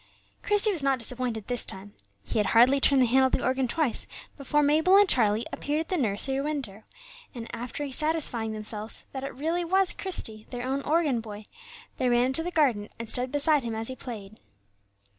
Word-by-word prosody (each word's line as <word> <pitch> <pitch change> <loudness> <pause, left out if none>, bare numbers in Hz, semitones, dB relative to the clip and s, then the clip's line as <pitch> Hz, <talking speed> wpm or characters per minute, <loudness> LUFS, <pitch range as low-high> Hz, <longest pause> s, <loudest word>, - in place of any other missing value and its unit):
Christie 415 +1 +3
was 350 -7 0
not 275 -1 +1
disappointed 235 -2 -2
this 245 -2 +1
time. 195 +2 -5 0.3
He 215 - -2
had 210 - +1
hardly 260 +4 +6
turned 270 -1 +5
the - - +4
handle 260 +3 +4
of - - -7
the - - 0
organ 260 0 +1
twice 280 -2 -1 0.3
before 295 +1 0
Mabel 315 +6 +4
and 405 0 +6
Charlie 220 - +2
appeared 295 +2 -2
at 325 - -8
the 370 - 0
nursery 265 +2 0
window; 275 -9 -4 0.5
and, 235 -1 -7
after 250 +5 -5
satisfying 280 -7 +1
themselves 215 0 -2
that 265 -1 -6
it 275 - -6
really 325 +6 -1
was 380 +2 +2
Christie, 220 - -5
their 245 0 -5
own 270 +2 -1
organ 300 -4 +1
boy, 215 -1 -9 0.5
they 255 - +1
ran 240 0 +3
into 265 +5 0
the 345 - -3
garden, 260 -11 +1
and 230 - -6
stood 250 +3 -2
beside 295 0 +2
him 230 -2 -4
as 225 +2 -3
he 260 - -5
played. 215 -5 -9
260 Hz, 200 wpm, -27 LUFS, 225-295 Hz, 0.5 s, hardly